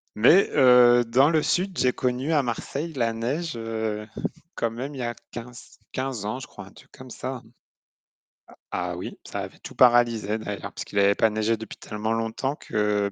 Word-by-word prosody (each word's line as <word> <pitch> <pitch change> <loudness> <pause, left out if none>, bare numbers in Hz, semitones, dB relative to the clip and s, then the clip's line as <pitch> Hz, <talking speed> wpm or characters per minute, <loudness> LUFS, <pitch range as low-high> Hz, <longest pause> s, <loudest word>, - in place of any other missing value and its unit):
Mais 145 - +6
heu, 125 -1 +7
dans 130 +6 +4
le 155 -2 +3
sud, 185 +4 0
j'ai 125 - +3
connu 130 +5 -1
à 145 -3 +3
Marseille 140 +6 -4
la 115 -4 0
neige, 135 +7 -2
heu, 110 -2 -3 0.5
quand 115 - 0
même 130 +6 -6
il 135 - -8
y - - -3
a 120 0 -3 0.2
quinz 120 +1 -10
quinze 130 -5 -3
ans, 110 +4 -2
je 130 - -7
crois, - - -11
un - - -15
truc - - -18
comme 130 0 -12
ça. 130 +1 -5 1.3
A - - -2
ah - - -5
oui, - - -7
ça - - -5
avait - - -7
tout - - -10
paralysé 120 -4 +4
d'ailleurs, 105 -2 -6
puisqu'il 100 - -3
avait 100 0 +4
pas 110 - +3
neigé 110 +1 0
depuis 110 0 -9
tellement 105 +1 -4
longtemps 115 +5 -2
que 105 -1 0
120 Hz, 190 wpm, -25 LUFS, 110-130 Hz, 1.3 s, heu